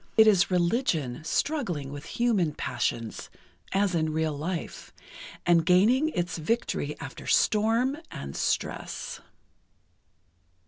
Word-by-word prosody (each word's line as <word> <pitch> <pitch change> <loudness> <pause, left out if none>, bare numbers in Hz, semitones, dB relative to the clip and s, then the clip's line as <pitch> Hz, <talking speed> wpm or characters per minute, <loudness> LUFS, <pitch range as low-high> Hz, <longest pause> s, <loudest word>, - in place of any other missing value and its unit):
It 220 - +8
is 200 -3 +5
religion 170 - 0
struggling 175 - -1
with 145 0 -8
human 205 -11 +2
passions, 115 -2 -3 0.4
as 195 -1 +2
in 160 -2 +1
real 160 0 0
life, 165 +4 -5 0.5
and 170 -1 +5
gaining 220 - +4
its 175 - -2
victory 155 -5 -1
after 135 - -8
storm 225 +5 +3
and 70 0 -7
stress. - - -2
175 Hz, 105 wpm, -27 LUFS, 155-220 Hz, 0.5 s, It